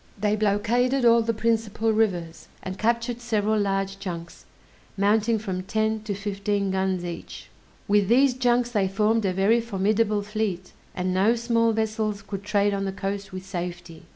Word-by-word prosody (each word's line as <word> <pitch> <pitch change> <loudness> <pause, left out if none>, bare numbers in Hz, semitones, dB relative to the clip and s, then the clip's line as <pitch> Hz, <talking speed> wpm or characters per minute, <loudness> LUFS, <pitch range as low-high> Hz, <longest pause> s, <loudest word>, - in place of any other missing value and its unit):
They 210 +1 +1
blockaded 230 +5 +1
all 235 0 +6
the 230 0 0
principal 225 0 0
rivers, 175 -7 -1 0.2
and 185 0 -6
captured 235 +1 0
several 215 -2 +1
large 195 -1 -1
junks, 170 -3 -7 0.5
mounting 215 +3 +2
from 190 -4 -4
ten 220 +3 -1
to 205 -2 -2
fifteen 200 0 -2
guns 190 -1 -1
each. 170 -1 -8 0.4
With 205 -1 +3
these 255 +4 +4
junks 245 -1 +1
they 205 -4 +1
formed 210 +3 +1
a 190 - +2
very 205 +5 +3
formidable 210 0 0
fleet, 205 -4 -3 0.2
and 185 0 -1
no 200 +6 +3
small 230 -1 +2
vessels 215 -2 -2
could 200 -1 -6
trade 205 0 +1
on 195 0 -1
the 195 - -2
coast 195 +1 -4
with 185 0 -7
safety. 175 -3 -6
205 Hz, 160 wpm, -25 LUFS, 195-225 Hz, 0.5 s, all